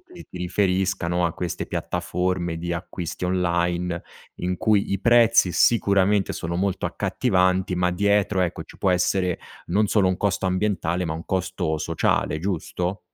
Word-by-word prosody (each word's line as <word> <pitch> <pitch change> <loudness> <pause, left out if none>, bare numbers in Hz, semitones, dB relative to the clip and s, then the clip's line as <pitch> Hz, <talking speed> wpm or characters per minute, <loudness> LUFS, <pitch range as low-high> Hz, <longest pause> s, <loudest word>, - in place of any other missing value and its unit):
ti 360 0 -14
ti - - -11
riferisca, 95 0 0
no, 85 +1 0
a 85 - -2
queste 90 0 -4
piattaforme 90 -2 -2
di 85 +1 -4
acquisti 85 0 -5
online, 85 -1 0 0.4
in 90 +1 -1
cui 110 -2 +2
i 100 - 0
prezzi 115 -5 +5
sicuramente 100 -1 +3
sono 85 +1 -4
molto 95 0 -1
accattivanti 90 0 +1
ma 90 0 +1
dietro, 100 0 +2
ecco, 90 -2 -2
ci - - -15
può 95 - +1
essere, 90 0 +1 0.3
non 105 +5 +2
solo 100 -2 +3
un 95 - 0
costo 100 -1 0
ambientale, 90 -2 0
ma 80 - -2
un 80 +2 -6
costo 95 -4 -1
sociale, 80 -1 0
giusto? 90 +1 -2
90 Hz, 155 wpm, -24 LUFS, 85-100 Hz, 0.4 s, prezzi